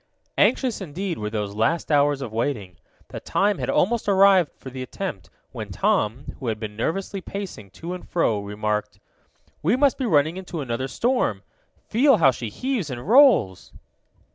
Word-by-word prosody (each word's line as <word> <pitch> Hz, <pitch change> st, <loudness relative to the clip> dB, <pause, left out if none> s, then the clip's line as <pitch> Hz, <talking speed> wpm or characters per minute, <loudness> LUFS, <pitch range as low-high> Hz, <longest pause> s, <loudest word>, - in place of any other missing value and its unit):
Anxious, 250 Hz, -6 st, +2 dB
indeed, 180 Hz, +1 st, -4 dB
were 105 Hz, 0 st, -3 dB
those 105 Hz, -2 st, -3 dB
last 115 Hz, +12 st, 0 dB
hours 145 Hz, -1 st, +3 dB
of 115 Hz, -4 st, -7 dB
waiting. 110 Hz, -, -3 dB, 0.3 s
The -, -, -6 dB
time 205 Hz, 0 st, 0 dB
had -, -, -3 dB
almost 220 Hz, +2 st, +1 dB
arrived 190 Hz, -4 st, +5 dB
for 130 Hz, -, -10 dB
the 130 Hz, 0 st, -7 dB
attempt, 130 Hz, -, -6 dB, 0.2 s
when -, -, -7 dB
Tom, 115 Hz, +6 st, 0 dB
who 130 Hz, -, -5 dB
had 110 Hz, -2 st, -2 dB
been 105 Hz, -2 st, -6 dB
nervously 190 Hz, -, -3 dB
pacing 185 Hz, -, -7 dB
to 165 Hz, -, -7 dB
and 180 Hz, -, -9 dB
fro, 115 Hz, -11 st, +1 dB
remarked: 105 Hz, 0 st, -3 dB, 0.6 s
"We 180 Hz, +10 st, +2 dB
must 275 Hz, +1 st, +2 dB
be 260 Hz, -, -1 dB
running 155 Hz, 0 st, +2 dB
into 180 Hz, -3 st, -6 dB
another 130 Hz, -1 st, -3 dB
storm. 245 Hz, -, 0 dB, 0.4 s
Feel 260 Hz, +2 st, +4 dB
how 140 Hz, -7 st, +5 dB
she 120 Hz, -3 st, -6 dB
heaves 240 Hz, -, -2 dB
and 125 Hz, +2 st, -6 dB
rolls!" 230 Hz, -, +4 dB
145 Hz, 165 wpm, -23 LUFS, -, 0.6 s, arrived